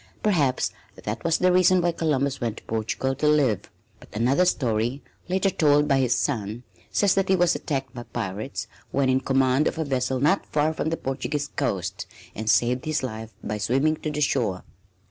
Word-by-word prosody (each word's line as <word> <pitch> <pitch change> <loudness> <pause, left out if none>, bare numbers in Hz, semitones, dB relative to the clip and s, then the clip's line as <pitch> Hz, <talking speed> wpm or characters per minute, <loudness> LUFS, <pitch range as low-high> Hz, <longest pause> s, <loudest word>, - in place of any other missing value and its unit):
Perhaps 150 -11 +2 0.3
that 105 +2 -4
was 165 -1 +2
the 180 0 +3
reason 185 0 +5
why 175 0 +2
Columbus 140 -5 -1
went 115 -2 -2
to - - -11
Portugal 115 +4 -2
to 150 - 0
live. 135 -10 +2 0.3
But - - -16
another 130 +11 +3
story, 120 -4 0 0.3
later 190 +1 +2
told 150 -3 +3
by 135 - +3
his 125 -2 +2
son, 115 -3 -2 0.3
says 200 -3 +3
that 195 -1 0
he 190 - +5
was 175 -1 +3
attacked 135 -4 -3
by 120 - -6
pirates 110 +1 -4 0.2
when 135 -1 +1
in 130 0 +3
command 135 +1 +2
of - - -2
a 160 - -1
vessel 130 -1 -1
not 150 +9 +2
far 150 +1 +1
from 155 - -2
the 165 - -1
Portuguese 140 +2 -3
coast, - - -2 0.3
and 110 +1 -3
saved 125 +5 +2
his 155 -3 -1
life 110 -3 -5
by 105 0 -3
swimming 135 +10 +2
to 155 - -4
the 150 0 -3
shore. 115 -10 0
135 Hz, 190 wpm, -25 LUFS, 120-155 Hz, 0.3 s, reason